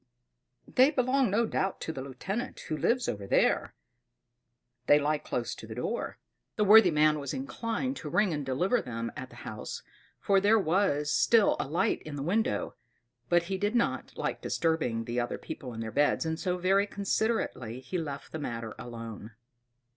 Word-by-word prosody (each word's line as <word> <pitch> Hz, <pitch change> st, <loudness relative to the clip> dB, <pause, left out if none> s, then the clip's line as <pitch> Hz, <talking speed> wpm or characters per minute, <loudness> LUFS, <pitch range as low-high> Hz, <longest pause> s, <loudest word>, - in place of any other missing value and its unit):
"They 260 Hz, +2 st, +5 dB
belong 260 Hz, -3 st, +2 dB
no 220 Hz, +4 st, +2 dB
doubt 195 Hz, -3 st, -1 dB
to 160 Hz, -, -3 dB
the 135 Hz, -, -5 dB
lieutenant 190 Hz, -, -5 dB
who 155 Hz, -, -3 dB
lives 245 Hz, +9 st, +1 dB
over 100 Hz, -2 st, -3 dB
the -, -, +1 dB
way. -, -, +3 dB, 1.2 s
They 145 Hz, -, +7 dB
lie 150 Hz, +1 st, +1 dB
close 120 Hz, -4 st, -3 dB
to 110 Hz, -, -10 dB
the 110 Hz, -, -7 dB
door." 175 Hz, -, -3 dB, 0.4 s
The 210 Hz, -, +2 dB
worthy 210 Hz, -1 st, +8 dB
man 150 Hz, -1 st, +3 dB
was 140 Hz, -2 st, -4 dB
inclined 230 Hz, -, -3 dB
to -, -, -6 dB
ring 205 Hz, -4 st, +2 dB
and 145 Hz, -1 st, -2 dB
deliver 175 Hz, -, +1 dB
them 115 Hz, -1 st, -4 dB
at 130 Hz, -3 st, -7 dB
the -, -, -15 dB
house, -, -, -6 dB, 0.4 s
for 195 Hz, -1 st, +3 dB
there 210 Hz, +3 st, +5 dB
was 160 Hz, -6 st, +1 dB
still 225 Hz, -3 st, +4 dB
a -, -, -1 dB
light 155 Hz, +5 st, 0 dB
in 155 Hz, -2 st, -7 dB
the 140 Hz, -, -4 dB
window; 215 Hz, -, 0 dB, 0.6 s
but 175 Hz, 0 st, +4 dB
he 190 Hz, +2 st, -3 dB
did 205 Hz, +3 st, 0 dB
not 235 Hz, -, 0 dB
like -, -, -2 dB
disturbing 160 Hz, -9 st, 0 dB
the 120 Hz, +2 st, -2 dB
other 120 Hz, -, -2 dB
people 125 Hz, -, -7 dB
in 115 Hz, -1 st, -6 dB
their 110 Hz, -1 st, -4 dB
beds, 145 Hz, +5 st, +2 dB
and 160 Hz, 0 st, -2 dB
so 180 Hz, -1 st, -1 dB
very 195 Hz, +3 st, +3 dB
considerately 200 Hz, -, -1 dB
he 175 Hz, +8 st, -4 dB
left 145 Hz, -4 st, -6 dB
the 160 Hz, -, -5 dB
matter 115 Hz, -5 st, -4 dB
alone. 115 Hz, -2 st, -8 dB
160 Hz, 185 wpm, -29 LUFS, 130-205 Hz, 1.2 s, worthy